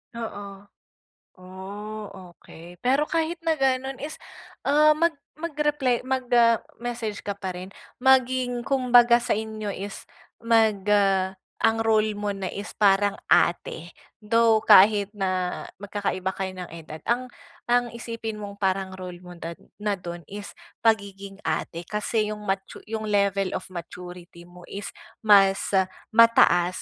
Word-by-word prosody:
Oo, 205 -3 -7 0.7
oh, 200 +4 -8 0.3
okey. 170 +1 -14
Pero 270 +4 +2
kahit 330 +2 -1
na 325 - +3
ganon 265 -2 -1
is, 305 +2 -5 0.5
ah, 300 +2 +5
mag 335 +1 +2 0.2
mag-reply, 295 -5 0
mag 260 0 -2
ah, 230 -1 +6 0.2
message 235 -4 -4
ka 200 -1 -5
pa 190 -2 -4
rin. 180 +1 -8 0.3
Maging 255 -2 +2
kumbaga 245 -3 +5
sa 235 - 0
inyo 215 -1 -4
is, 200 0 -6 0.4
mag 225 -3 +3
ah, 195 -2 +2 0.2
ang 225 0 +3
role 215 -1 +2
mo 205 0 -2
na 195 -2 -4
is 205 +1 -6
parang 205 0 +3 0.2
ate, 170 0 +1 0.2
though 225 0 +3
kahit 205 0 +6
na, 185 -3 -2 0.2
magkakaiba 195 -2 -3
kayo 190 -1 -5
ng 180 -1 -7
edad 160 -1 -9
ang 250 +2 0 0.4
ang 245 -1 +2
isipin 230 -2 -6
mong 200 -1 -8
parang 190 -1 -1
role 180 -1 -8
mo 180 -1 -12
na 170 0 -6 0.2
na 210 0 -1
dun 175 -3 -7
is 205 +3 -8 0.3
pagiging 200 -3 0
ate. 165 +1 -3
Kasi 210 +2 -1
'yong 210 - -9
matu 195 -1 -4
'yong 220 -1 -3
level 200 -2 +1
of 185 - -4
maturity 175 0 -9
mo 175 0 -14
is 200 +1 -6 0.3
mas 195 -3 +5 0.5
mataas 220 -6 +5
205 Hz, 140 wpm, -25 LUFS, 190-235 Hz, 0.7 s, ah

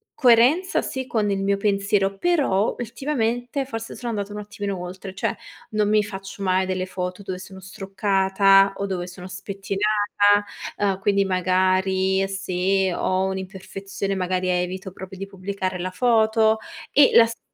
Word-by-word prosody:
coerenza, 255 +9 +4
sì, 260 -1 -4
con 215 -3 0
il 195 0 -1
mio 200 0 +2
pensiero, 200 -1 +1
però 275 - +1
ultimamente 245 +1 -2
forse 225 -3 -6
sono 240 -1 -5
andata 205 -1 -4
un 210 - -5
attimino 205 -2 -5
oltre, 185 +2 -7
cioè - - -1 0.4
non 210 -1 +1
mi 210 0 +3
faccio 195 0 -7
mai 185 0 +2
delle 185 0 -2
foto 185 +1 -5
dove 185 -1 -5
sono 190 0 -11
struccata 195 0 +2
o 200 - -2
dove 180 -2 -3
sono 180 0 -9
spettinata, 205 +1 +1 0.3
uhm, 195 -2 0
quindi 200 0 +2
magari 190 +1 +1
se 190 0 0
ho 185 +2 0
un'imperfezione, 190 +1 -5
magari 185 0 -1
evito 180 +1 -2
proprio 190 +1 -10
di 195 - -5
pubblicare 190 -1 -4
la 185 +1 -3
foto 220 0 +3 0.3
e 285 -2 +6
la 230 - +8
sta 230 0 -7
195 Hz, 150 wpm, -23 LUFS, 190-210 Hz, 0.4 s, la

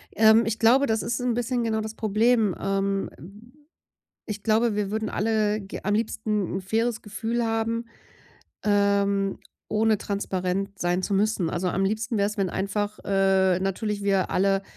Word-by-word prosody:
Ähm, 220 +1 +6
ich 225 0 -2
glaube, 250 +5 +5
das 220 0 +1
ist 235 +2 -2
'n 245 -1 0
bisschen 245 +1 -1
genau 220 -1 0
das 220 0 -6
Problem. 220 -1 +2
Ähm. 195 0 -1 1.2
Ich 210 -1 -5
glaube, 220 0 +2
wir 205 -1 -1
würden 220 0 -2
ge - - -7
alle 215 -1 0 0.2
am 205 - +1
liebsten 210 -3 -1
'n - - -5
faires 225 +4 -1
Gefühl 225 +3 -2
haben, 225 +1 -1 0.8
ähm, 200 -1 +2 0.3
ohne 215 -1 +2
transparent 195 0 -3
sein 175 +1 0
zu 200 - -2
müssen. 200 -4 +1
Also 180 +2 -1
am 195 +2 0
liebsten 220 +4 -1
wär's, 205 +1 0
wenn 195 -2 +1
einfach, 205 +3 -2
äh, 195 -2 +3
natürlich 200 +2 -2
wir 195 -2 +1
alle 195 +1 +2
210 Hz, 160 wpm, -25 LUFS, 195-225 Hz, 1.2 s, Ähm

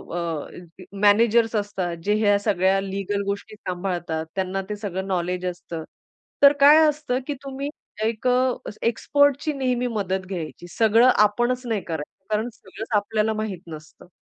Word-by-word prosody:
अ, 170 +2 -6
managers 225 +2 +4
असतात 195 -4 -2
जे 210 - +2
ह्या 205 0 +5
सगळ्या 195 -2 +2
लीगल 200 +1 -3
गोष्टी 205 +2 -4
सांभाळतात. 175 -4 -3
त्यांना 190 0 -1
ते 210 - -2
सगळं 195 -2 -4
नॉलेज 180 -1 -1
असतं. 175 -2 -5 0.6
तर 280 0 +9
काय 290 +2 +8
असतं 295 -4 -1
की 295 - -1
तुम्ही 275 +1 -4 0.3
एक 225 +2 -1
अ, 250 0 +3 0.3
एक्सपर्टची 285 +5 +2
नेहमी 250 -3 0
मदत 190 -5 -2
घ्यायची. 175 -2 -6
सगळं 225 +2 +5
आपणच 240 +5 +2
नाही 225 -4 -1
करायचं. 160 +4 -7
कारण 220 +3 0
सगळंच 210 +3 -10
आपल्याला 215 +1 0
माहित 215 -5 -4
नसतं. 155 +1 -11
205 Hz, 145 wpm, -23 LUFS, 185-235 Hz, 0.6 s, तर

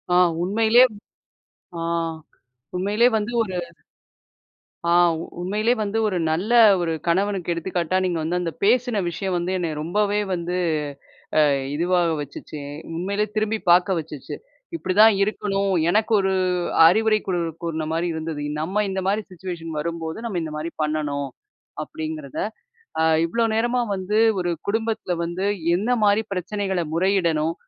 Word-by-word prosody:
ஆ - - +6 0.3
உண்மையிலே 220 +5 +5 1.0
ஆ - - -4 0.9
உண்மையிலே 205 +6 +3
வந்து 215 +3 -3
ஒரு 185 -3 -6 1.3
ஆ - - +1 0.5
உண்மையிலே 210 +6 +1
வந்து 210 +1 -2
ஒரு 185 -3 -1
நல்ல 190 +9 -1 0.3
ஒரு 165 -1 -1 0.2
கணவனுக்கு 190 0 +1
எடுத்துக்காட்டா, 175 +1 -1
நீங்க 175 -2 0
வந்து 175 +3 -1
அந்த 165 -2 -2
பேசின 240 +1 +3
விஷயம் 180 +2 -3
வந்து 175 +2 -2
என்ன 170 -2 -1
ரொம்பவே 205 +5 0
வந்து 175 +1 -2 0.8
அ - - +7 0.3
இதுவா 175 +3 +2 0.2
வச்சுச்சு, 145 +1 -9 0.4
உண்மையிலே 200 +4 -1
திரும்பி 215 +1 0
பார்க்க 180 +1 +4
வச்சுச்சு, 150 -3 -7 0.4
இப்பிடிதான் 210 - +5
இருக்கணும். 200 -1 0 0.2
எனக்கு 215 +3 +1
ஒரு 190 0 +1 0.5
அறிவுரை 215 +5 +4
கூ 190 - -1 0.3
கூறினமாரி 160 +1 -2
இருந்தது, 160 -2 -4 0.2
நம்ம 195 +7 0
இந்தமாரி 195 +2 -1
சிச்சுவேஷன் 170 -2 -6
வரும்போது, 165 +2 -4
நம்ம 185 -6 -2
இந்த 155 -1 -5
மாரி 160 +2 -4
பண்ணணும், 150 -2 -1 0.5
அப்பிடிங்கிறத. 155 -3 -6 0.6
அ - - +3 0.2
இவ்ளோ 230 +6 +1
நேரமா 240 +2 +1
வந்து, 195 +3 -1 0.2
ஒரு 175 -1 0 0.2
குடும்பத்தில 220 -4 -1
வந்து 180 +4 -2 0.3
என்னமாரி 215 0 +2
பிரச்சனைகள 190 0 -2
முறையிடணும்? 170 -3 +1
185 Hz, 125 wpm, -23 LUFS, 165-210 Hz, 1.3 s, அ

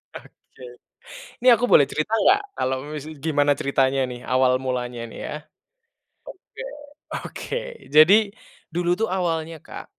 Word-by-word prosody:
Oke. - - -15 0.8
Ini 255 - +4
aku 235 +2 -1
boleh 140 - +6
cerita 155 +8 -3
enggak 375 - +4
kalau 130 +1 0
mise 150 0 -7
gimana 145 -1 +2
ceritanya 135 -1 +1
nih, 125 -1 -8
awal 130 0 +2
mulanya 125 -2 -3
nih, - - -11
ya. - - -5 1.2
Oke - - -7 0.5
oke, 480 - -5 0.3
jadi 155 +6 +8 0.6
dulu 175 0 -1
tuh, 225 - +2
awalnya 165 -4 -2
Kak, - - -10
150 Hz, 130 wpm, -23 LUFS, 130-175 Hz, 1.2 s, jadi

